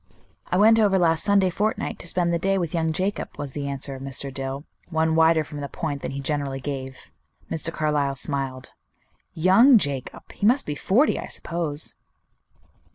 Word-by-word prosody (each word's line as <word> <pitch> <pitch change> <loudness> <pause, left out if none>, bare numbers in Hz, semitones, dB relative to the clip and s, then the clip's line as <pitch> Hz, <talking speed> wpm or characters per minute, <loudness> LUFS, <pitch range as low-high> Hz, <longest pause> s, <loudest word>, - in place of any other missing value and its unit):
"I 180 - 0
went 220 +3 +6
over 200 -3 +4
last 165 -3 +2
Sunday 200 -2 +3
fortnight 210 +5 -2
to - - -7
spend 170 0 +1
the 170 - +1
day 195 +3 +1
with 170 -4 -2
young 160 -1 0
Jacob," 190 +5 -3
was 145 -2 -5
the 140 +1 -4
answer 140 0 -3
of 135 - -8
Mr. 135 0 -3
Dill, 135 +1 -4 0.3
one 160 -1 +1
wider 160 0 +4
from 145 -1 -8
the 140 - -5
point 145 -4 -4
than - - -4
he 135 - -5
generally 140 -1 -2
gave. 130 -1 -6 0.4
Mr. 165 +1 -1
Carlyle 150 -3 0
smiled. 135 -2 -3 0.6
"Young 195 - +6
Jacob! 140 - -3
He 205 - 0
must 255 +4 +3
be 150 - -3
forty, 220 - +2
I - - -6
suppose." 160 -3 -4
160 Hz, 180 wpm, -24 LUFS, 140-185 Hz, 0.6 s, went